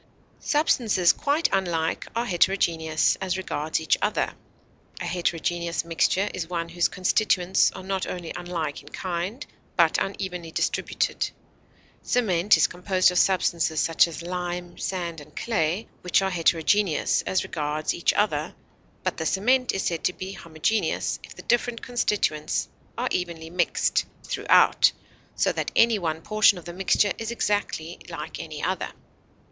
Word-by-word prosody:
Substances 235 - +3
quite 290 +3 +1
unlike 170 -4 0
are 235 +1 0
heterogeneous 170 -5 +2
as 190 -1 -2
regards 155 -4 -2
each 160 - +1
other. - - 0 0.7
A - - -4
heterogeneous 170 -1 -1
mixture 175 +4 +1
is 165 -2 -4
one 170 -1 -2
whose 170 0 +1
constituents 185 -1 +2
are - - -8
not 190 0 -2
only 175 -2 -5
unlike 170 -4 -4
in 145 - -14
kind, 185 - -4 0.3
but 165 -3 +4
unevenly 185 -4 -4
distributed; - - -1 0.7
cement 205 -5 +3
is - - +5
composed 185 +1 +2
of 180 - +2
substances 170 -4 +2
such 165 +1 +4
as 170 0 -7
lime, 175 0 -4
sand, 170 -4 -3
and 150 +1 -16
clay, 190 -2 -1
which 180 +2 +2
are 190 - 0
heterogeneous 170 +1 +2
as 185 - +1
regards 150 0 -2
each - - +2
other, - - 0 0.5
but - - -1
the 160 - -3
cement 250 +7 +2
is 195 - -2
said 170 -2 -2
to 180 - +2
be 190 +1 -6
homogeneous 170 +4 -1
if - - -12
the - - -11
different 240 -1 0
constituents 210 -11 0 0.3
are - - 0
evenly 165 -2 -3
mixed 175 0 +1 0.2
throughout, - - +4 0.4
so - - +2
that - - -2
any 230 -2 +5
one 160 -2 -3
portion 215 -2 +4
of 175 - -10
the 175 - -7
mixture 195 +2 +2
is 225 0 -4
exactly 205 -7 -2
like 160 -3 -6
any 155 -2 -7
other. 185 +1 -1
180 Hz, 145 wpm, -25 LUFS, 165-195 Hz, 0.7 s, is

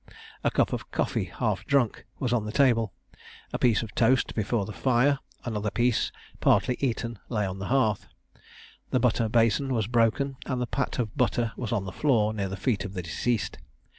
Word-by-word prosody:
A - - +3
cup - - +1
of - - -4
coffee, - - -1
half - - -2
drunk, 135 -6 +1
was 125 -2 -1
on 120 -3 +1
the 105 - -4
table, 115 -5 +3 0.6
a - - -1
piece 115 -2 +3
of 105 -3 -8
toast 125 +2 +3
before 110 -1 0
the 105 - -7
fire, 135 +4 +2 0.3
another 105 -3 -1
piece, 120 +2 +1 0.3
partly 125 - +3
eaten, 115 -4 -2
lay 105 -4 0
on 95 0 -4
the 95 - -4
hearth, 115 -6 +1 0.8
the - - +2
butter 115 -2 +2
bason 115 +4 +2
was 115 -5 +1
broken, 120 +4 +1
and 130 -2 -1
the 125 - 0
pat 140 +2 -2
of 110 -4 -2
butter 120 -3 +1
was 120 -4 -4
on 95 - 0
the 95 - -5
floor 110 -7 +2
near 100 -3 -2
the 95 - -5
feet 100 -2 0
of 100 - -6
the 90 -3 -4
deceased. 105 - -1
115 Hz, 195 wpm, -27 LUFS, 105-125 Hz, 0.8 s, A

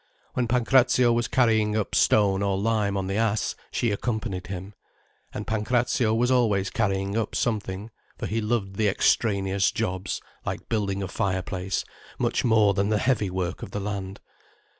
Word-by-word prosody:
When 125 -1 0
Pancrazio 125 0 +4
was 120 0 0
carrying 110 -4 +2
up 105 - -2
stone 100 -2 +3
or 100 -1 +1
lime 105 -1 0
on 95 - -1
the 95 +2 -2
ass, 110 -1 +1 0.2
she 120 - 0
accompanied 105 -3 -3
him. 95 +2 -6 0.6
And - - -5
Pancrazio 115 +3 +1
was 120 +2 +2
always 105 -6 +2
carrying 100 -4 -1
up 115 -2 -1
something, 105 -2 -2 0.3
for - - -4
he 110 +2 -1
loved 105 -3 -1
the 110 - +2
extraneous 100 -1 +2
jobs 95 +1 -2 0.2
like - - -5
building 100 -3 -1
a - - -3
fire 95 0 -1
place 95 +1 -3 0.3
much - - 0
more 110 -4 +4
than 100 +1 0
the 110 - +2
heavy 110 -3 +1
work 90 -1 -3
of - - -6
the 105 - -4
land. 100 -1 -4
105 Hz, 165 wpm, -25 LUFS, 95-115 Hz, 0.6 s, Pancrazio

